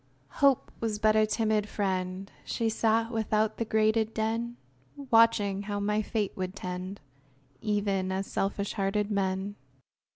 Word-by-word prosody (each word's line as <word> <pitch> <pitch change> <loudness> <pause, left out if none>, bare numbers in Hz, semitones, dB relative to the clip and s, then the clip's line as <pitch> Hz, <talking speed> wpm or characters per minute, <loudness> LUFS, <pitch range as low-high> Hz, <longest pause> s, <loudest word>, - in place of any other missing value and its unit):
Hope 275 -2 +4
Was 220 -2 -1
but 215 0 +3
a 215 0 +4
timid 215 -1 +1
friend; 190 -1 -2
She 230 -1 -1
sat 225 +1 +1
without 220 -1 0
the 230 - -1
grated 220 0 +2
den, 230 +2 -1 0.5
Watching 225 -4 +4
how 205 0 -3
my 210 +1 +1
fate 210 -2 -1
would 185 0 -4
tend, 185 +1 -5 0.6
Even 200 -3 0
as 190 +1 -1
selfish 200 +1 -2
hearted 205 +1 0
men. 195 0 -1
210 Hz, 135 wpm, -29 LUFS, 195-220 Hz, 0.6 s, Hope